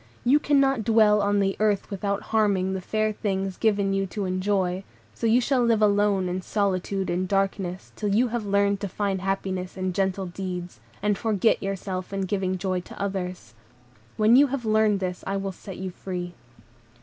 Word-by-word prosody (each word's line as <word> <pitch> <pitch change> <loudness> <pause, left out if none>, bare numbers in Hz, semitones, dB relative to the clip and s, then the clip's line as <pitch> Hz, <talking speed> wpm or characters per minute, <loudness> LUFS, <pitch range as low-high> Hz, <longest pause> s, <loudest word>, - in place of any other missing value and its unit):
You 275 +5 +5
cannot 275 -5 +2
dwell 215 -1 +4
on 205 0 +2
the 195 0 +1
earth 210 -1 +1
without 200 0 -2
harming 200 -4 +2
the 190 - -3
fair 215 +3 0
things 195 -2 -2
given 200 -2 +1
you 195 0 0
to 200 +2 -4
enjoy, 185 0 0 0.3
so 230 - -2
you 230 +2 +5
shall 255 0 +2
live 230 -2 +3
alone 205 -2 +3
in 180 +1 -2
solitude 195 -1 -1
and 180 +2 -1
darkness, 195 -1 -1
till 210 - -2
you 235 +5 +3
have 235 -1 -2
learned 200 0 +2
to 200 -1 -4
find 195 0 -2
happiness 190 -1 -3
in 185 -1 -2
gentle 190 0 0
deeds, 180 -5 -6 0.2
and 205 -1 +1
forget 220 -1 +2
yourself 190 -1 -4
in 195 0 -2
giving 190 -1 -1
joy 185 0 -1
to 180 - -11
others. 180 - -4 0.6
When 215 +2 +5
you 285 +2 +7
have 265 -3 -4
learned 215 -2 +3
this, 180 -1 -3
I 195 - -1
will 195 0 -3
set 190 +1 -10
you 190 -1 -4
free." 180 -1 -5
195 Hz, 185 wpm, -25 LUFS, 185-210 Hz, 0.6 s, you